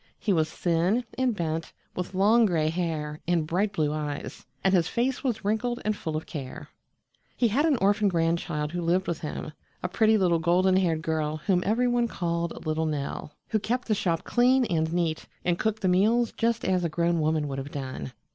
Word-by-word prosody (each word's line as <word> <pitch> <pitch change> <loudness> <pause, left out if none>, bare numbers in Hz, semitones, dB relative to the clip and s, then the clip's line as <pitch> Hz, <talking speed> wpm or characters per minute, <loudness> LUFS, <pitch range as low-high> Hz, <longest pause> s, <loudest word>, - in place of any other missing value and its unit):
He 205 - 0
was 160 -2 +2
thin 175 +8 +1
and 255 -2 +1
bent, 165 -3 -3 0.2
with 180 +1 -4
long 220 +4 +5
gray 160 -4 +1
hair 160 -3 -3
and 170 -3 +2
bright 190 +6 0
blue 155 -7 0
eyes, 150 -2 -5 0.2
and 190 - +3
his 170 -3 +3
face 250 +5 -1
was 235 -6 -2
wrinkled 240 +4 0
and 215 0 +1
full 160 -5 -3
of 155 - -5
care. 135 -5 -7 0.7
He 240 - +3
had 285 +9 +2
an 290 -5 +3
orphan 205 +2 +3
grandchild 165 -3 0
who 175 0 -3
lived 175 +3 +1
with 170 - -2
him 155 0 -5 0.3
a - - +1
pretty 220 +4 +3
little 175 -4 +2
golden 180 +3 +3
haired 165 -4 +1
girl 155 -1 -1
whom 185 -3 +3
every 235 +5 +2
one 240 -1 +2
called 170 -5 -3
Little 155 +1 0
Nell, 150 0 -4
who 220 - +1
kept 245 +4 -2
the 220 - +2
shop 170 -5 0
clean 250 +1 +3
and 160 -5 0
neat 170 -2 -1 0.2
and 175 -1 +1
cooked 220 -1 -1
the - - +3
meals 220 +6 +3
just 230 0 0
as 185 -1 +1
a 170 - 0
grown 170 +2 +1
woman 155 -1 +1
would 135 -1 -4
have 135 +1 -6
done. 130 - -5
175 Hz, 205 wpm, -27 LUFS, 160-215 Hz, 0.7 s, long